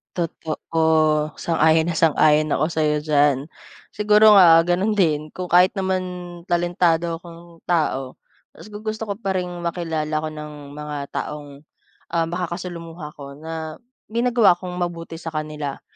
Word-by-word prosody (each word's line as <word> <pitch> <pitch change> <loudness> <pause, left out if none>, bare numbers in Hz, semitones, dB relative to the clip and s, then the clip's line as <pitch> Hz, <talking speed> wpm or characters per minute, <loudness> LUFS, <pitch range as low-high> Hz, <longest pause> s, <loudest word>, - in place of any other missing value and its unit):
Totoo. 160 -2 0
Sang-ayon 160 0 +3
na 165 - -2
sang-ayon 155 -1 +3
ako 155 - +1
sa'yo 155 -2 +1
diyan. 145 -1 +2 0.4
Siguro, 210 0 +5
ah, 165 -3 +8
gano'n 180 +5 +1
din, 155 -6 0
kung 180 -1 -6
kahit 180 +3 +5
naman 190 -2 -1 0.4
talentado 175 -1 +1
akong 170 0 -14
tao, 135 -6 0 0.4
mas - - -13
gu 210 - -8
gusto 215 0 -4
ko 200 - -3
pa 195 -4 -2
rin 180 -1 -2
makilala 165 -3 -3
ako 155 - -3
ng 150 -1 -8 0.3
mga 150 0 -5
taong, 150 -1 -5 0.6
ah, 165 -1 +1
makakasalumuha 170 -2 -5
ko 140 -1 -9
na 160 +3 -7 0.2
may 230 +2 -2
nagawa 240 -6 +5
akong 180 0 -8
mabuti 170 -2 -4
sa 165 -1 -7
kanila. 150 -2 -4
165 Hz, 145 wpm, -22 LUFS, 155-180 Hz, 0.6 s, ah